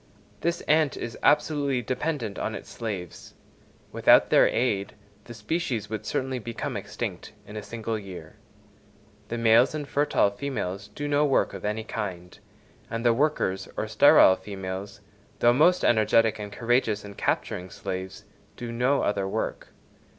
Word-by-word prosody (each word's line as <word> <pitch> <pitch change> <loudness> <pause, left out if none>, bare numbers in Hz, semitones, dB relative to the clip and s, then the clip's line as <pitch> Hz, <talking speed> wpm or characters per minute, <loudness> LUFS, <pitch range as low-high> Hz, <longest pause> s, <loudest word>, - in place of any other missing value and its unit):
This 170 +1 -1
ant 155 -2 +2
is 115 -1 -5
absolutely 145 -3 +2
dependent 130 -3 -3
on 110 - -3
its - - -9
slaves; 100 -7 -6 0.6
without - - +5
their - - +6
aid, 105 -5 0 0.3
the 120 - -9
species 115 -2 -3
would 110 0 -4
certainly 130 +2 -2
become 115 0 -5
extinct - - -5
in 105 - -11
a 105 - -4
single 115 0 -4
year. 90 -3 -10 0.9
The 120 - -4
males 115 +5 +4
and 150 -2 -4
fertile 140 -9 +2
females 100 -5 -4
do 145 0 -3
no 145 0 +2
work 140 -3 +2
of - - -8
any 105 +2 -2
kind, 95 -5 -6 0.5
and 115 +1 -4
the 120 - +5
workers 115 -9 0
or 110 - -2
sterile 110 -2 +6
females, 95 0 -7 0.4
though 120 0 +4
most 165 +7 +4
energetic 110 0 +3
and 105 -1 -6
courageous 115 -2 0
in 100 - -9
capturing 90 -2 -2
slaves, 95 +1 -6 0.3
do 120 -1 -6
no 125 +4 +1
other 100 -1 0
work. - - -3
115 Hz, 150 wpm, -26 LUFS, 100-130 Hz, 0.9 s, their